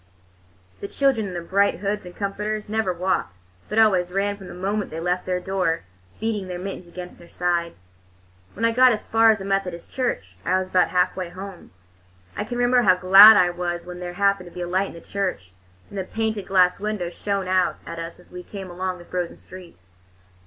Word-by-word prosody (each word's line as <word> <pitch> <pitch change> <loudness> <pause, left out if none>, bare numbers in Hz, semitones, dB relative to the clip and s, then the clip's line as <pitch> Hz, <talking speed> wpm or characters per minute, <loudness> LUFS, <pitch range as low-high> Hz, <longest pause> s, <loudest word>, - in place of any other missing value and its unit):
The - - -5
children, 260 -4 +1
in 185 - -6
their 175 -1 -4
bright 200 +3 +2
hoods 200 -1 -3
and 180 - -11
comforters, 210 +1 -3
never 215 -2 0
walked, 175 - -1 0.3
but 210 - -3
always 190 -5 +4
ran 200 +2 0
from 195 -2 -12
the - - -9
moment 200 +3 -2
they 160 - -6
left 180 +2 -1
their 180 -1 0
door, 180 -3 -1 0.4
beating 215 -3 -2
their 180 -1 -5
mittens 185 -1 -6
against 180 +1 -9
their 170 - -15
sides. 170 - -2 0.6
When 225 - -1
I 230 - +3
got 250 +1 +6
as 215 - -5
far 225 0 +4
as 220 - +4
the 195 - -7
Methodist 190 -3 -2
Church, 100 - -3
I 185 - +2
was 185 0 -3
about 185 -1 +3
halfway 180 0 0
home. 185 0 -10 0.7
I 205 - -3
can 245 +2 -5
remember 245 0 +4
how 185 -5 +5
glad 195 +4 +9
I 180 -3 +4
was 175 -1 -4
when 180 0 -8
there 175 0 -6
happened 200 -1 +1
to - - -21
be 180 - -5
a 175 - -3
light 190 +2 0
in - - -10
the 170 - -11
church, 185 - -3 0.4
and 200 - -5
the - - -1
painted 220 0 -3
glass 185 -1 +3
window 205 -4 -3
shone 200 0 -3
out 185 -1 +1
at 170 0 -7
us 165 +1 -7
as 180 - -20
we 180 - -7
came 190 0 -8
along 185 +1 -3
the 175 - -13
frozen 180 -1 -3
street. 180 -2 -13
185 Hz, 215 wpm, -23 LUFS, 180-205 Hz, 0.7 s, glad